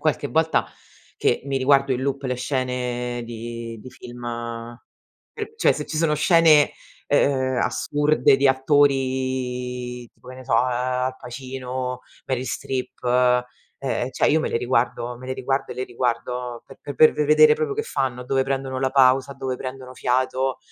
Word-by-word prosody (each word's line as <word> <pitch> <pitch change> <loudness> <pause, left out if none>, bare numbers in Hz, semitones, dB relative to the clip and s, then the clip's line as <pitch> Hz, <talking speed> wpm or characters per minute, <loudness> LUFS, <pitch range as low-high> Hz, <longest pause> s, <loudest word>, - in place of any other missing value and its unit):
qualche 150 -2 0
volta 160 0 +2 0.5
che - - +1
mi 135 -1 -1
riguardo 135 +1 +3
in 125 - -1
loop 140 +1 -2
le 125 -2 -2
scene 125 -2 -2
di 115 0 -7
di 130 - -10
film, 120 -1 -11 1.1
per 445 -1 -6
cioè 410 - +4
se 150 - -4
ci 155 - -5
sono 155 -1 +2
scene, 155 -1 +5 0.4
ehm, 130 -2 +2
assurde 145 +3 +2
di 135 +1 +3
attori 130 -3 0
tipo, 125 - -18
che 130 - -9
ne 130 - -11
so, 120 - 0
ehm, 125 +2 +3 0.4
Al 130 - -9
Pacino, 125 0 -5 0.2
Meryl 130 -1 -2
Streep, 130 -2 -4
eh 125 0 +3 0.4
ehm, 130 -1 -1
cioè - - +2
io 160 - +4
me - - -1
le - - 0
riguardo, 120 0 -1
me 130 - -10
le 130 - -2
riguardo 135 +1 -2
e - - -11
le 130 - -3
riguardo 120 0 -3
pe 140 +1 -9
per 155 - +6
ve 150 - 0
vedere 155 0 +6
proprio 150 -3 -2
che - - -1
fanno, 130 -3 -2
dove 135 +1 +1
prendono 135 -1 -2
la 130 0 0
pausa, 135 0 +4
dove 130 -2 -4
prendono 130 -1 -7
fiato, 130 +1 0
130 Hz, 170 wpm, -23 LUFS, 125-140 Hz, 1.1 s, per